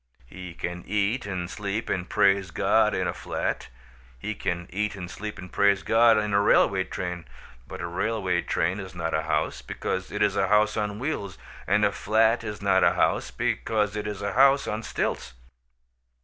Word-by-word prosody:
He 90 +6 -10
can 90 +1 -5
eat 105 +3 0
and 90 -3 -3
sleep 100 +3 -4
and 90 -1 -2
praise 100 -1 +3
God 85 - +2
in - - 0
a - - -2
flat; - - -3 0.5
he 105 - -4
can 85 -3 -3
eat 105 +1 -1
and 90 -2 -7
sleep 105 +1 -6
and 90 -2 -10
praise 100 -4 +3
God 115 +3 +5
in 105 -1 -1
a 100 - +4
railway 95 -2 +3
train. 90 -2 -5 0.4
But - - -8
a - - -3
railway 95 0 -1
train 90 +4 -1
is 95 -1 -8
not 80 -1 -3
a - - +1
house, - - -1
because 95 0 -4
it 105 0 0
is 100 -1 +2
a 95 -1 +2
house 105 +2 +3
on 105 -1 -2
wheels. 110 -7 -4 0.3
And - - +3
a - - +2
flat 110 +2 +2
is 105 -3 -6
not - - +3
a - - +5
house, - - +1
because 105 -2 -1
it 105 0 -3
is 105 -1 -5
a 100 - -2
house 135 +2 +5
on 105 +1 -2
stilts. 105 - -3
100 Hz, 190 wpm, -26 LUFS, 90-105 Hz, 0.5 s, God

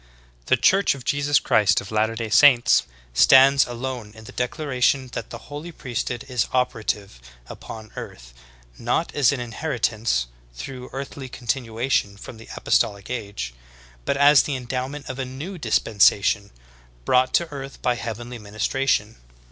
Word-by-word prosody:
The - - +4
Church 195 -5 +3
of 130 - -11
Jesus 145 0 +2
Christ 100 -3 +3
of 100 - -9
Latter 110 +1 +1
day 115 -1 -4
Saints 130 -1 +6 0.3
stands 135 - +6
alone 120 -3 -5
in 110 - -12
the - - -11
declaration 130 -1 0
that - - -5
the - - -7
Holy 150 +4 -6
Priesthood 120 -3 -4
is 125 -3 0
operative 110 - -2 0.2
upon 110 - -10
earth, - - -9 0.5
not 120 +8 -1
as 140 -3 +4
an 140 - -3
inheritance 115 - -1 0.3
through 125 - -8
earthly 135 0 -7
continuation 120 -3 -1
from 110 - -10
the 115 - -14
apostolic 100 +3 0
age, 100 - -5 0.5
but 140 - -1
as 145 0 +7
the 145 - -3
endowment 130 +3 -5
of 130 +1 -6
a - - -1
new 150 +9 -7
dis 115 - +2
pensation, 100 -1 +2 0.6
brought 130 0 +3
to 170 - +2
earth 135 -1 -8
by 125 - +2
heavenly 120 +1 -6
ministration. 110 +2 -1
125 Hz, 150 wpm, -23 LUFS, 110-135 Hz, 0.6 s, as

